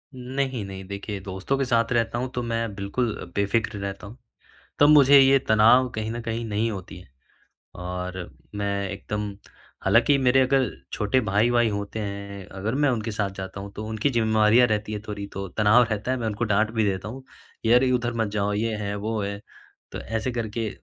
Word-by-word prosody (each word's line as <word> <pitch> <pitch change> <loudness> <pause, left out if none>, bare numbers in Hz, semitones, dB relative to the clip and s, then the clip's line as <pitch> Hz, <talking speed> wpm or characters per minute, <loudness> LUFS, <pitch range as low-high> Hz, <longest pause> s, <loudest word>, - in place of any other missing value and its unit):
नहीं, 130 -1 -3
नहीं, 95 0 -7
देखिए, 100 +1 -5
दोस्तों 95 +8 -3
के 135 - 0
साथ 115 -1 +1
रहता 115 0 0
हूँ, 125 - -2
तो 125 - -3
मैं 115 -2 -2
बिल्कुल 105 +4 -2 0.2
बेफिक्र 100 +1 0
रहता 100 0 -5
हूँ। 115 +5 -12 0.6
तब 145 - +7
मुझे 140 -2 +8
ये 135 0 +6
तनाव 115 +4 +5
कहीं 110 0 -3
न 120 +1 -4
कहीं 115 0 -3
नहीं 110 +1 0
होती 95 -2 -7
है। 90 - -16 0.7
और 90 0 -5 0.3
मैं 100 -1 -2
एकदम 105 +1 -4 0.5
हालाँकि 145 - +4
मेरे 130 0 +4
अगर 130 -2 +2 0.2
छोटे 105 +5 +1
भाई-वाई 115 +2 +2
होते 100 +1 -4
हैं, 100 -1 -6
अगर 100 +5 -3
मैं 145 +1 +2
उनके 115 -2 -2
साथ 105 -2 -1
जाता 95 +1 -6
हूँ, 100 0 -7
तो 105 - -6
उनकी 110 +5 0
ज़िम्मेवारियाँ 110 0 +4
रहती 105 0 -1
है 105 - -3
थोड़ी, 100 -1 -4
तो 100 0 -6
तनाव 105 +5 +4
रहता 110 +3 -2
है, 130 - +1
मैं 115 - -3
उनको 110 +2 -1
डाँट 105 0 +2
भी 110 -1 0
देता 95 0 -1
हूँ, 130 +4 -8 0.4
यार 120 +3 +5
उधर 120 -1 0
मत 110 - -1
जाओ 105 -1 0
ये 110 +2 -1
है, 100 -1 -3
वो 110 +2 -2
है, 100 0 -4 0.5
तो - - -5
ऐसे 110 +3 -2
करके 115 -1 -3
110 Hz, 195 wpm, -25 LUFS, 100-120 Hz, 0.7 s, मुझे